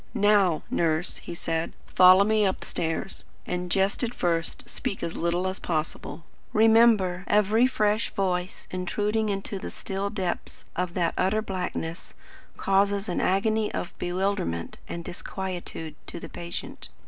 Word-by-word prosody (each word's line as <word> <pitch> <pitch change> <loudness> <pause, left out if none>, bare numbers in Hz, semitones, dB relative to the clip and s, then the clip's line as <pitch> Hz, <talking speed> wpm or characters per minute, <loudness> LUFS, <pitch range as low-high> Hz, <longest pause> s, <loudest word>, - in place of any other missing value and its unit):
"Now, 205 -6 +4
Nurse," 160 +1 +1
he - - -7
said, 165 0 -2
"follow 185 +1 +7
me 215 +1 +3
upstairs, 185 -2 -2 0.2
and, 180 0 -3
just 195 +2 +2
at 245 0 -2
first, 165 -1 -1
speak 195 - -4
as 165 - -3
little 175 +2 0
as 185 +1 -3
possible. 155 -1 -3 0.3
Remember, 220 -4 +5
every 210 +4 +4
fresh 215 -3 +1
voice 185 -3 -1
intruding 210 +4 0
into 195 0 -3
the - - -5
still 195 +1 -3
depths 190 -4 -4
of 180 -1 -2
that 170 -2 +1
utter 205 +4 +2
blackness, 180 -4 -4 0.4
causes 200 +1 +2
an 175 - -1
agony 215 +3 +2
of - - -4
bewilderment 175 - -1
and 170 0 -6
disquietude 175 -4 -5
to - - -5
the - - -8
patient. 170 0 -6
190 Hz, 135 wpm, -27 LUFS, 175-205 Hz, 0.4 s, follow